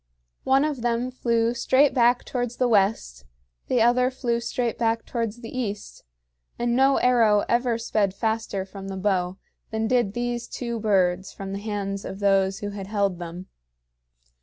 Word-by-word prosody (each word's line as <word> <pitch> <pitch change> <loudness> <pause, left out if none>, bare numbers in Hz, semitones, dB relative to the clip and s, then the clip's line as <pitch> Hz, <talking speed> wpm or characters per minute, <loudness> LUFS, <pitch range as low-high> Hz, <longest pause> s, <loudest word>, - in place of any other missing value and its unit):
One 270 +2 +4
of 290 -5 -3
them 240 +1 0
flew 235 -2 +1
straight 260 +4 +3
back 245 -1 +3
towards 245 -2 -3
the 250 - +2
west, 195 - +1 0.4
the 245 -3 +3
other 250 +2 +3
flew 245 -3 -1
straight 235 0 -2
back 230 -1 0
towards 230 -2 -3
the 230 +1 -8
east; 210 -5 -5 0.5
and 240 0 0
no 270 +2 +4
arrow 225 -5 +4
ever 240 -1 +1
sped 210 -4 0
faster 220 -3 -2
from 195 0 -9
the 195 0 -5
bow 185 -2 0 0.3
than 220 0 -1
did 235 -4 +1
these 240 0 -2
two 235 -2 -4
birds 190 -3 +1
from 195 0 -7
the 200 - -3
hands 200 -2 -4
of 190 - -6
those 195 -1 +2
who 205 0 -3
had 200 -1 -7
held 200 -3 0
them. 175 +1 -7
225 Hz, 165 wpm, -25 LUFS, 195-240 Hz, 0.5 s, One